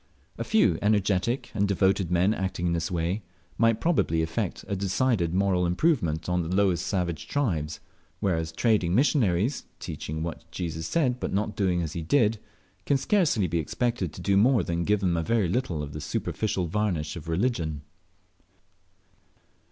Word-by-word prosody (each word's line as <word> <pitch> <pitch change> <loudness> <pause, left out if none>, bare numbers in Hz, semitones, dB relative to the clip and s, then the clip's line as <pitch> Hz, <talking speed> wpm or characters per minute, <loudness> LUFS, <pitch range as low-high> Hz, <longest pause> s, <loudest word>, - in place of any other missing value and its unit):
A - - -1
few 115 - +3
energetic 105 +3 +1
and 100 -2 +1
devoted 95 -2 +2
men 90 +4 +3
acting 95 -3 -3
in 85 - +1
this 85 0 -1
way 85 +4 -1 0.4
might 115 -1 +3
probably 85 - +1
effect 80 0 -3
a 100 - -2
decided 100 -1 +1
moral 95 -1 +2
improvement 85 - +1
on 90 0 +1
the 85 +2 -2
lowest 95 -3 +2
savage 90 -5 -2
tribes, 80 - -1 0.4
whereas 80 -4 0
trading 95 -2 +2
missionaries, 120 - +2
teaching 80 +1 -5
what 85 -1 -6
Jesus 80 -2 -4
said, 130 -7 +1
but - - -3
not 105 +1 -1
doing 90 -4 +1
as 80 - -4
He 85 - -3
did, 110 - +2 0.5
can 140 - +4
scarcely 145 - +2
be 85 -1 0
expected 115 +1 -1
to - - -9
do 100 +2 +2
more 115 0 +4
than 85 0 -2
give 105 -1 +2
them 90 -3 +1
a - - +1
very 110 +2 +1
little 85 - -1
of 75 -1 -7
the 75 - -6
superficial 95 +5 -2
varnish 85 -4 -1
of 85 -2 -8
religion. 80 - -1
95 Hz, 165 wpm, -27 LUFS, 85-110 Hz, 0.5 s, can